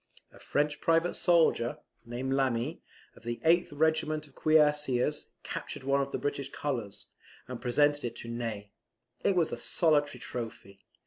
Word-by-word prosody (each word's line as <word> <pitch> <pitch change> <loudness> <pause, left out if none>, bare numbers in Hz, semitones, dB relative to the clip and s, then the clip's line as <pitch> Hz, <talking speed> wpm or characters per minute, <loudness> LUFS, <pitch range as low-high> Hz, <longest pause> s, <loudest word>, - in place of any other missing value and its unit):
A - - -15
French 145 0 -1
private 165 +1 +2
soldier, 165 -9 +3 0.3
named 125 +3 -2
Lami, 135 +2 0 0.3
of - - -16
the 120 0 -4
8th 170 +2 +5
regiment 155 0 +1
of 140 - -20
cuirassiers, 150 -3 +2 0.2
captured - - -6
one 140 +1 +2
of 140 0 -3
the - - -1
English 140 -1 -3
colours, 120 -9 -4 0.4
and 125 -2 -7
presented 145 +4 +2
it 120 - -3
to - - -9
Ney. 115 -4 -4 0.5
It 195 - +3
was 170 -3 +2
a - - -3
solitary 145 +5 +2
trophy. 110 -5 -7
140 Hz, 150 wpm, -30 LUFS, 120-155 Hz, 0.5 s, 8th